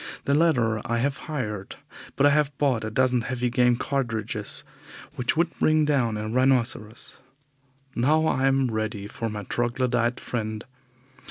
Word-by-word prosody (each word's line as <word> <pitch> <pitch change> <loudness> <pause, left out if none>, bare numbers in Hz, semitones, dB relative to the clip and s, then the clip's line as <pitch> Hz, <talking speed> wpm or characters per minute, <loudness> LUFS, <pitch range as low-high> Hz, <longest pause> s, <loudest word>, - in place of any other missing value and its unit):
The 140 - +2
latter 125 -9 +2
I 115 - -1
have 140 +4 0
hired, 105 -10 -4 0.4
but 140 - +3
I 145 - +6
have 150 -1 +1
bought 130 -6 +1
a 110 - -2
dozen 125 +1 +2
heavy 125 0 -2
game 125 0 +3
cartridges, 115 -5 -2 0.5
which 125 +5 -1
would 170 0 +2
bring 155 0 +3
down 125 -7 +1
a 105 0 -4
rhinoceros. 120 -2 0 0.8
Now 155 +6 +3
I 135 -3 +2
am 135 -2 +2
ready 110 -2 -3
for 115 +2 -4
my 105 -1 -5
troglodyte 120 +2 0
friend. 110 -2 -4
125 Hz, 150 wpm, -25 LUFS, 110-135 Hz, 0.8 s, I